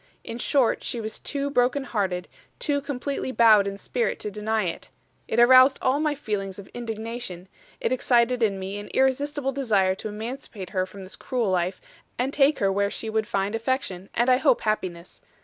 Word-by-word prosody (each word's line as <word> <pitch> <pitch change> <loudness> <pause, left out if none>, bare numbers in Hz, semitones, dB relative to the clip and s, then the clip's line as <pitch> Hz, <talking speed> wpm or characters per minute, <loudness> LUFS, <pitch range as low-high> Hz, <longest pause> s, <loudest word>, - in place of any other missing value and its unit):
In 230 - -6
short 265 -2 +2
she 240 - -3
was 220 -1 -5
too 280 0 -3
broken 255 +2 +2
hearted, 190 -8 -2 0.3
too 285 -2 0
completely 280 -1 -3
bowed 220 -5 +6
in 200 0 -4
spirit 235 +3 -2
to 210 - -4
deny 215 +1 -1
it. 170 -2 -4 0.4
It 225 - 0
aroused 255 +2 +7
all 260 +3 +1
my 305 -1 +1
feelings 200 -7 -4
of 200 - -9
indignation 225 -5 -6 0.3
it - - -1
excited 245 -1 +2
in 205 -3 +2
me 195 +2 -5
an 205 - -8
irresistible 270 +1 +1
desire 210 -9 +2
to 205 +3 -6
emancipate 215 -3 -7
her 185 -1 0
from 195 0 -10
this 185 - -9
cruel 240 -6 -1
life, 180 +1 0 0.4
and 260 +3 -1
take 285 +1 +4
her 195 -1 +2
where 200 +1 +1
she 220 +1 -5
would 220 -1 0
find 200 -2 -1
affection, 225 -6 -2
and 240 +2 +2
I 255 -1 +5
hope 270 -2 +3
happiness. 185 -5 -3
225 Hz, 185 wpm, -25 LUFS, 200-260 Hz, 0.4 s, aroused